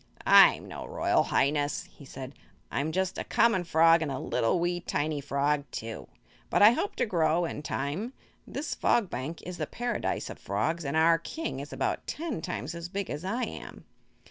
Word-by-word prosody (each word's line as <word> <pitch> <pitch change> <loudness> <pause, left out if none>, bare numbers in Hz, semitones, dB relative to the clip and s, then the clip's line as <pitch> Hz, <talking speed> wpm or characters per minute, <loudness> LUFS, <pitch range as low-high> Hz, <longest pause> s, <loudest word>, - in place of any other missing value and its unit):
"I'm - - +7
no - - -7
Royal - - +2
Highness," 145 +1 +1
he 140 - -16
said. 135 0 -8 0.4
"I'm 145 +3 -1
just 190 +2 -1
a - - -2
common 225 -6 +3
frog; 165 0 +5
and 155 -3 -1
a 135 - -2
little 120 +6 0
wee 175 +1 0
tiny 150 -3 -2
frog, 140 +1 0
too. 115 0 -6 0.4
But - - +4
I 210 - +10
hope 400 - -2
to - - +1
grow, 170 -4 +2
in 155 - -5
time. 150 - -3 0.3
This 295 +2 -4
Fog 225 -6 +1
Bank 135 +7 -5
is 180 -1 -7
the - - -2
Paradise 240 -1 -2
of - - -10
Frogs 150 - -1
and 140 +3 -1
our 165 +1 +5
King 325 - -5
is - - -7
about - - -2
ten 305 - -3
times 155 0 -4
as 170 0 -6
big 200 0 -4
as 150 - -5
I 230 +7 -1
am." - - -7
165 Hz, 190 wpm, -29 LUFS, 145-190 Hz, 0.4 s, I